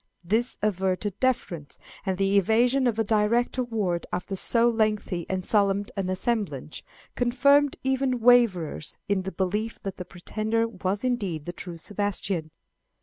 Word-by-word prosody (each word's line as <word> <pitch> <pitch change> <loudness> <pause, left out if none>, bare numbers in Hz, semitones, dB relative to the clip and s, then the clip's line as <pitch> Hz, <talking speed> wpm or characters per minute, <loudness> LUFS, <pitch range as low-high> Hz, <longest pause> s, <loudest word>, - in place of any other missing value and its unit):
This 220 +8 0
averred 190 0 0
deference, 180 - -1 0.3
and 190 -1 0
the 195 +1 +1
evasion 245 +6 +3
of 230 -3 0
a 225 - +2
direct 220 +4 +1
award 210 -8 -1
after 180 +2 -3
so 230 +4 +4
lengthy 215 -6 0
and 185 -1 -2
solemn 200 -1 +2
an 195 -2 -2
assemblage, 185 - -2 0.3
confirmed 275 +4 +3
even 265 -1 +1
waverers 225 -11 +3
in 200 -2 +1
the 190 +1 -5
belief 210 +5 -2
that 195 -1 -5
the 180 - -6
pretender 215 +6 -2
was 200 -2 -3
indeed 200 - -1
the 175 - -5
true 175 -1 -7
Sebastian. 195 -3 -2
205 Hz, 145 wpm, -26 LUFS, 185-235 Hz, 0.3 s, so